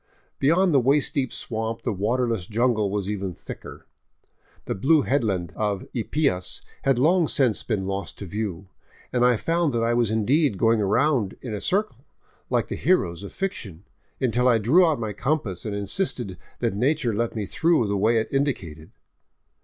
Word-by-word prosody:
Be 135 - +1
yond 175 +2 +4
the 140 - +6
waist 140 +4 +2
deep 130 -4 -1
swamp 115 0 -3
the - - -1
waterless 110 -1 -1
jungle 110 -2 +1
was 100 -1 -2
even 100 -3 -3
thicker. - - -10 0.8
The - - -2
blue 145 +9 +3
headland 105 - 0
of 105 -3 -2
Ypias 115 -7 -1 0.2
had 135 -2 +2
long 165 +5 +3
since 125 -8 +1
been 105 -5 -2
lost 100 +1 -4
to 100 - -7
view, 100 -2 -4 0.5
and 125 -1 +2
I 125 -2 +4
found 165 +2 0
that 115 -1 0
I 115 +1 +2
was 120 -2 +2
indeed 120 +3 +2
going 115 +2 +3
round 115 +1 +1
in 120 -4 -5
a 105 - -4
circle, 190 - -1 0.5
like - - +1
the - - -4
heroes 90 - +1
of 100 - -8
fic 195 -1 -2
tion, 95 - -10 0.4
until 125 -1 +1
I 120 -2 +5
drew 150 - +4
out 155 -5 +1
my 110 -2 -3
compass 115 - -2
and 105 - -3
insisted 100 - -2 0.3
that 115 -4 +1
nature 125 +2 +1
let 115 +3 -1
me 105 -2 -2
through 160 - +2
the 100 - -1
way 110 +4 +2
it 110 - 0
indicated. 90 - -2
115 Hz, 180 wpm, -24 LUFS, 100-140 Hz, 0.8 s, the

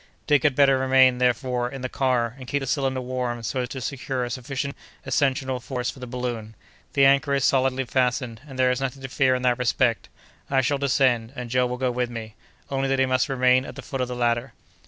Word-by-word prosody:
Dick 145 -3 +3
had 145 -2 +2
better 135 -1 +5
remain, 130 -1 +4
therefore, 125 0 +1
in 135 0 -8
the - - 0
car, 125 -3 0
and 130 - -9
keep 140 - 0
the - - -3
cylinder 135 -1 -1
warm 125 -2 -3
so 130 - -2
as 125 - -4
to 130 - -5
secure 130 0 -3
a 120 - -4
sufficient 135 +2 -4 0.3
ascensional 130 -2 0
force 125 0 -3
for - - -15
the 125 - -7
balloon. 120 -3 -4 0.4
The 140 -1 +5
anchor 140 +1 +4
is 135 - +1
solidly 130 0 +2
fastened, 125 -2 -1
and 135 -2 -10
there 130 -1 +3
is 125 +1 -2
nothing 135 0 -4
to 135 - -5
fear 130 0 +2
in 125 - -3
that 125 -1 +2
respect. 125 -2 +1 0.4
I 135 -1 +3
shall 140 +2 0
descend, 130 -4 +1
and 125 -3 -6
Joe 125 0 +2
will 125 0 -4
go 130 -1 0
with 125 0 -1
me, 115 -2 -7 0.4
only 135 0 0
that 135 - +1
he 130 - +3
must 130 +2 +1
remain 130 -1 +3
at - - -9
the - - -8
foot 135 -2 -4
of 125 - 0
the 125 - -5
ladder." 120 +1 0
130 Hz, 235 wpm, -24 LUFS, 125-135 Hz, 0.4 s, better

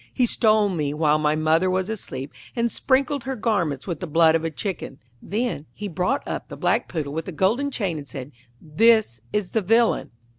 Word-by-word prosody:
He 250 - +2
stole 215 -3 +3
me 150 -5 -2
while 155 -1 +3
my 150 0 +2
mother 160 +4 +2
was 185 0 0
asleep, 145 -11 -5 0.2
and 235 -1 +1
sprinkled 275 0 +1
her 265 0 -2
garments 190 - -1
with 170 -5 -4
the 180 - -5
blood 160 +1 +5
of 165 0 +1
a 165 - 0
chicken.' 160 -3 -5 0.2
Then 215 - -3
he 210 - -5
brought 185 - -1
up - - -4
the - - -8
black - - +1
Poodle 150 -5 -3
with 160 +1 -3
the - - -5
golden 210 - +1
chain, 195 - -2
and 145 - -10
said, 135 0 -8 0.3
'This 210 - +3
is 210 -3 -1
the 220 - +1
villain.' 225 +4 +2
185 Hz, 200 wpm, -23 LUFS, 155-225 Hz, 0.3 s, blood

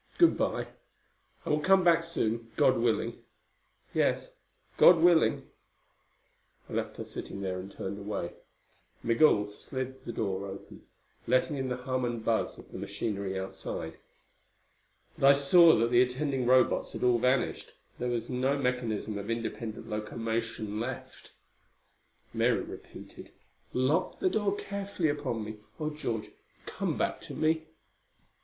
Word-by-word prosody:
"Good 340 - +6
by. - - -1 0.8
I - - -1
will 150 - +3
come 190 +4 +4
back 170 -1 +5
soon, 115 -8 -2
God 130 - +4
willing." 115 -1 0 0.7
"Yes. - - +1 0.4
God 175 - +8
willing." 170 0 +4 1.2
I - - -10
left - - -2
her - - -4
sitting 100 - -7
there 95 -1 -2
and 95 +2 -8
turned 100 +2 -5
away. 100 -4 -4 0.7
Migul 115 -4 +4
slid 130 +4 -6
the 120 - -5
door 100 -3 -2
open, 95 0 -10 0.4
letting 135 +4 +2
in 130 -1 -2
the 125 - -2
hum 130 0 -2
and 120 -2 -3
buzz 115 -1 0
of - - -14
the - - -7
machinery 100 -3 -3
outside. 95 0 -6 1.2
But 135 - +5
I 140 - +9
saw 160 +4 +7
that 115 +2 +1
the 120 0 +6
attending 130 0 0
Robots 130 0 +3
had - - -5
all 125 -1 +4
vanished. 125 +2 0 0.3
There 125 - -1
was 120 -1 -2
no 130 +2 0
mechanism 120 -5 -1
of 100 - -7
independent 115 -1 -4
locomotion 110 0 -3
left. 125 +3 -6 1.0
Mary - - +2
repeated, - - -10 0.4
"Lock 145 +9 +1
the 370 - +2
door 205 -2 +1
carefully 200 -5 -2
upon 140 -6 -2
me. 110 0 -7 0.2
Oh, 155 -1 -2
George, 115 -8 -4 0.3
come - - -2
back - - -1
to - - -8
me!" 160 0 +1
125 Hz, 140 wpm, -30 LUFS, 110-145 Hz, 1.2 s, I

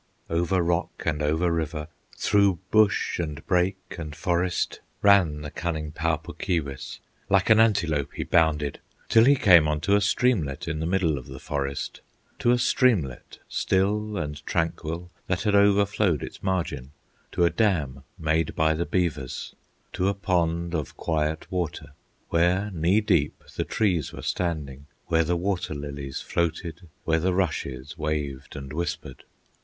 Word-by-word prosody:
Over 85 +2 +1
rock 85 +1 -1
and 75 -1 0
over 80 +4 +1
river, 80 -2 -2 0.3
Through 100 -3 +3
bush, 110 -4 +3
and 80 -2 -4
brake, 95 0 0
and 75 -2 -6
forest, 90 +1 0 0.2
Ran 95 -7 +5
the 75 -1 -6
cunning 80 -3 -3
Pau 80 +1 0
Puk 75 - -11
Keewis; 70 -7 -3 0.3
Like 100 +2 +3
an 110 - +7
antelope 85 -10 +2
he - - -2
bounded, 75 -4 +2 0.3
Till 115 0 +6
he 140 +2 +6
came 90 - +6
unto 75 +6 0
a 105 - +3
streamlet 90 - +1
In 80 -1 -2
the 80 - -2
middle 85 -6 +1
of 60 - -13
the 65 - -8
forest, 70 0 -4 0.4
To - - +2
a 125 - +5
streamlet 115 - +1
still 105 +2 0
and 75 -4 -4
tranquil, 85 +1 -2 0.2
That 90 -1 -1
had 105 -2 +1
overflowed 100 -5 +3
its - - -8
margin, 75 -8 -2 0.4
To 85 - +3
a 85 - +3
dam 80 -9 0
made 80 0 0
by 80 0 +3
the 85 +2 -2
beavers, 80 -8 -2 0.4
To 90 - 0
a 100 - +1
pond 85 -3 0
of 75 -5 -3
quiet 80 -1 -1
water, 90 -4 -3 0.4
Where 90 +5 +2
knee 90 +5 +2
deep 85 -9 +1
the - - -1
trees 90 -9 0
were - - -8
standing, 75 -6 -3 0.2
Where 80 -1 +2
the 85 +2 0
water 90 -3 -2
lilies 70 -1 -5
floated, 85 0 -3
Where 80 0 +2
the 90 +2 +1
rushes 75 -7 -2
waved 75 -3 -3
and 70 -1 -7
whispered. 85 +2 -4
85 Hz, 155 wpm, -26 LUFS, 75-95 Hz, 0.4 s, an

